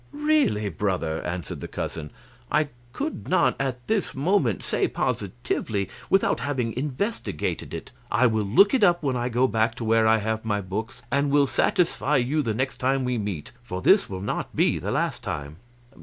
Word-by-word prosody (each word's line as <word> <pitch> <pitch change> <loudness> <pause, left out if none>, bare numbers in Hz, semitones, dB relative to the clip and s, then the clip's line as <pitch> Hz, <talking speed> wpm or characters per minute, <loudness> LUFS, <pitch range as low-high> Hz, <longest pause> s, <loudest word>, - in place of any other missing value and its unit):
"Really, 295 - +2
brother," 85 -3 -1
answered 85 0 -4
the - - -5
cousin, 75 -2 -5 0.4
"I 150 -1 +2 0.2
could 300 - -4
not 185 - +3
at 130 -2 -2
this 215 -3 0
moment 140 - +1
say - - +1
positively 100 -2 -2 0.2
without 195 - +3
having 125 -6 -1
investigated 145 - -3
it; - - -7 0.2
I 115 +4 +3
will 110 -3 +2
look 195 - +5
it 255 -5 +3
up 175 -4 +4
when 135 -3 0
I 120 0 -1
go 125 +2 +3
back 110 0 +1
to - - -6
where 115 0 +3
I 110 0 +5
have 110 +1 -2
my 105 -2 0
books, 105 +5 -5
and 140 +1 +2
will 145 0 +4
satisfy 150 0 +1
you 135 +5 +1
the 115 -6 -1
next 130 +1 -1
time 130 0 +1
we 125 -2 0
meet, 100 -8 -4
for 95 -7 -5
this - - +5
will 95 -1 -5
not 100 - -3
be - - +2
the - - -4
last - - -1
time." 75 +2 -5
120 Hz, 185 wpm, -25 LUFS, 105-145 Hz, 0.4 s, look